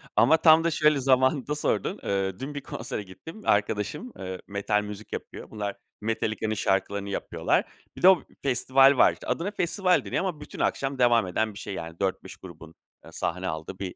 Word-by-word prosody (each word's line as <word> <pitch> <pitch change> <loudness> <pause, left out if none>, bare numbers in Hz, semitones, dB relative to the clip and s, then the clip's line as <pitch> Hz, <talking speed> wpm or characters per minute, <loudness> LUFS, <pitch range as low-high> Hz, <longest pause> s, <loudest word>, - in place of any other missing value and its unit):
Ama 160 +2 +5
tam 160 0 +6
da 170 - +1
şöyle 150 -2 +3
zamanında 130 +2 +2
sordun. 150 - -1
Eee, 95 +1 -1
dün 140 +3 -5
bir 145 - -5
konsere 115 -4 -5
gittim. 160 - -12
Arkadaşım, 105 - 0
eee, 95 -1 -6
metal 100 +1 0
müzik 105 +1 -8
yapıyor. - - -7
Bunlar, 105 -2 -4 0.3
Metallica'nın 110 0 -1
şarkılarını 100 0 -1
yapıyorlar. - - 0 0.3
Bir - - -8
de 185 - +8
o 190 - +4 0.2
festival 135 +1 +4
var - - +6
işte. - - -12
Adına 180 +5 -1
festival 185 -1 +1
deniyor - - -1
ama 165 -6 -4
bütün 150 - -10
akşam 135 -1 -1
devam 120 -5 +4
eden 110 +4 -1
bir - - -10
şey 100 - -6
yani. 85 -1 -7
4-5 95 -1 -2
grubun 85 -2 -12 0.4
sahne 90 +2 -3
aldığı 80 +3 -5
bir 95 -2 -5
110 Hz, 180 wpm, -26 LUFS, 95-145 Hz, 0.4 s, de